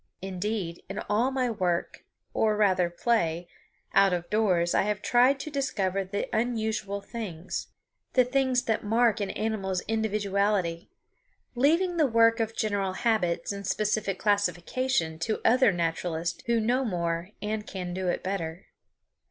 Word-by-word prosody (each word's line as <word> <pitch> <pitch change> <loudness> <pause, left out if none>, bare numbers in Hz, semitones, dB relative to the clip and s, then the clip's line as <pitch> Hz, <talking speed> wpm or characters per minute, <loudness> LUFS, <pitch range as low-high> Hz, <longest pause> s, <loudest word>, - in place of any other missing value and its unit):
Indeed, 190 -2 -3
in 195 - -5
all 220 +5 +2
my 260 -2 0
work, 180 -5 -2 0.3
or 215 -1 +2
rather 185 -4 +3
play, 175 -3 0 0.5
out 195 -1 +5
of 175 -1 -2
doors 185 -6 +2
I - - +4
have 210 0 -2
tried 255 +3 +4
to 310 - -6
discover 195 -9 -1
the 200 +2 -3
unusual 220 -3 -1
things, 195 -6 -5 0.5
the 255 -1 +5
things 255 -1 +1
that 225 -3 -1
mark 225 +1 +2
an 200 -2 -2
animal's 195 -4 -2
individuality, 200 -5 0 0.6
leaving 335 +8 +2
the 310 -3 +4
work 230 -1 +4
of 225 0 -1
general 200 -3 0
habits 185 -6 0
and 200 -1 -5
specific 210 0 0
classification 200 -2 0
to 215 +6 -1
other 250 -2 +5
naturalists 170 -1 -2
who 235 -1 +3
know 245 +4 +1
more 170 -4 -2
and 210 0 -3
can 180 -2 -5
do 185 0 -3
it 175 - -1
better. 180 -2 -4
205 Hz, 145 wpm, -27 LUFS, 180-230 Hz, 0.6 s, out